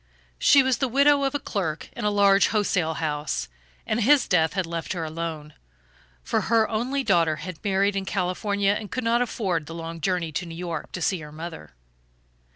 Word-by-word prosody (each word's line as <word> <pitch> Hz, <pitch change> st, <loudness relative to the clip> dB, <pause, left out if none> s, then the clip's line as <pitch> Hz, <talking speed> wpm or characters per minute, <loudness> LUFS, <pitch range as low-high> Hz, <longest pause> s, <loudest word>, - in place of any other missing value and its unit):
She 280 Hz, -1 st, +6 dB
was 260 Hz, -1 st, +1 dB
the 270 Hz, -, +1 dB
widow 280 Hz, +3 st, +4 dB
of 270 Hz, +1 st, -1 dB
a -, -, +1 dB
clerk 180 Hz, -, -3 dB
in -, -, -6 dB
a -, -, +3 dB
large 200 Hz, -1 st, +4 dB
wholesale 185 Hz, -6 st, 0 dB
house, 150 Hz, -, -2 dB, 0.4 s
and 225 Hz, +2 st, 0 dB
his 275 Hz, +4 st, +4 dB
death 160 Hz, -3 st, +2 dB
had 190 Hz, -1 st, -1 dB
left 165 Hz, +1 st, -4 dB
her 170 Hz, -3 st, -3 dB
alone, 160 Hz, -1 st, -5 dB, 0.7 s
for -, -, 0 dB
her 225 Hz, -1 st, +2 dB
only 255 Hz, +5 st, -1 dB
daughter 165 Hz, -8 st, +3 dB
had 165 Hz, +1 st, -8 dB
married 200 Hz, 0 st, +1 dB
in 195 Hz, -1 st, -2 dB
California, 200 Hz, +2 st, 0 dB
and 210 Hz, 0 st, -3 dB
could 255 Hz, -, -3 dB
not 230 Hz, +1 st, +2 dB
afford 185 Hz, -10 st, -1 dB
the 165 Hz, -, -7 dB
long 165 Hz, 0 st, -6 dB
journey 175 Hz, -2 st, -1 dB
to 180 Hz, +4 st, -3 dB
New 165 Hz, -, -8 dB
York 170 Hz, -3 st, -5 dB
to 180 Hz, -, -3 dB
see 185 Hz, +1 st, +1 dB
her 150 Hz, -1 st, -10 dB
mother. 155 Hz, -, -9 dB
185 Hz, 195 wpm, -25 LUFS, 165-215 Hz, 0.7 s, She